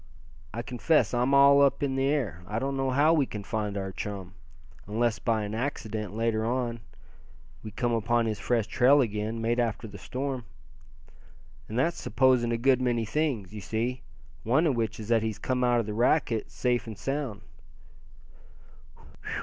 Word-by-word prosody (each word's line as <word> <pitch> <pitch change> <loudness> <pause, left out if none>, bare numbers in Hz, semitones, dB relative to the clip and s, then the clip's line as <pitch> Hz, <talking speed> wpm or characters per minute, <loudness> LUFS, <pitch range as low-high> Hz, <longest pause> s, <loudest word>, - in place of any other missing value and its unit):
I 115 +2 -4
confess 125 -1 +1
I'm 125 +2 +1
all 140 0 +7
up 140 0 +3
in 135 -2 0
the 135 0 +1
air. 135 - -1
I 105 - -3
don't 135 +3 -1
know 135 0 0
how 145 +5 +4
we 145 -5 +2
can 105 -1 -6
find 105 -1 -3
our 95 -1 -3
chum, 95 -2 -6 0.5
unless 110 0 0
by 110 -2 0
an 105 +1 -5
accident, 110 -4 -4
later 115 -1 0
on, 120 0 -1 0.8
we 110 - -7
came 120 +3 -1
upon 115 +1 +1
his 110 -2 -2
fresh 120 -3 0
trail 130 +5 +4
again, 110 -1 -2
made 120 +2 +1
after 115 -1 -1
the 100 -1 -11
storm. 130 -2 -4 1.2
And 110 - -4
that's 165 +7 0
supposing 130 -3 +3
a 115 - +1
good 130 +1 +3
many 120 -3 +1
things, 115 -6 -1
you 105 - -6
see, 115 +5 -2 0.4
one 130 - +2
of 145 -5 +2
which 115 -1 -2
is 110 0 -7
that 115 -1 +4
he's 110 -1 -2
come 125 +2 -1
out 120 -1 +3
of 115 - -1
the 105 - -4
racket 120 0 +1
safe 125 -2 -1
and 110 -2 -7
sound." 135 -2 -3
120 Hz, 175 wpm, -28 LUFS, 110-130 Hz, 1.2 s, all